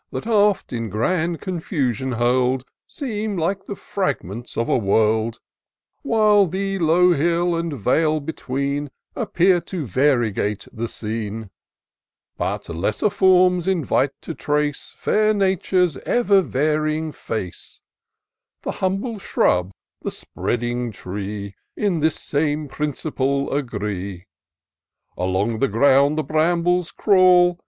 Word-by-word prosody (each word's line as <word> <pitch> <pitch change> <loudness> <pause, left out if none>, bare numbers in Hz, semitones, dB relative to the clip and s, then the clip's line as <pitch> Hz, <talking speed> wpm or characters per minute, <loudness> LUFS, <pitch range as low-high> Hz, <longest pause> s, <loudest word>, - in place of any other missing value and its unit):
That - - -5
oft, 210 - +2
in 115 -2 -3
grand 160 - 0
confusion 140 - -2
hurl'd, 125 +2 +1 0.2
Seem 215 - -4
Kke 190 +4 -1
the 200 - -4
fragments 120 - -4
of 115 - 0
a - - +2
world; 110 +1 +1 0.6
While 215 -6 +4
the 195 +2 -2
low 175 +2 +4
hill 170 +3 +1
and 165 0 -2
vale 155 +8 +2
between, 140 -1 -3 0.3
Appear 180 0 +2
to 170 -2 -5
variegate 115 -4 +1
the 115 0 -3
scene* 110 -1 -5 0.8
But - - -3
lesser 100 - -1
forms 185 -2 +4
invite 150 -6 +1
to 165 - -6
trace 150 -1 -2
Fair 215 0 +2
Nature's 185 -4 +1
ever 205 - +3
varying 155 +1 0
face: 110 -10 -6 0.8
The - - -2
humble 195 +4 -1
shrub, 90 - +1 0.3
the - - -3
spreading 120 0 -3
tree. 100 +1 -6 0.2
In 195 -6 0
this 155 0 +2
same 150 0 -1
principle 140 -1 -2
agree. 100 -8 -3 0.9
Along 95 +5 -1
the 135 - +3
ground 140 +5 +4
the 155 - +1
brambles 170 +3 +1
crawl. 180 -3 +4
150 Hz, 115 wpm, -22 LUFS, 115-180 Hz, 0.9 s, While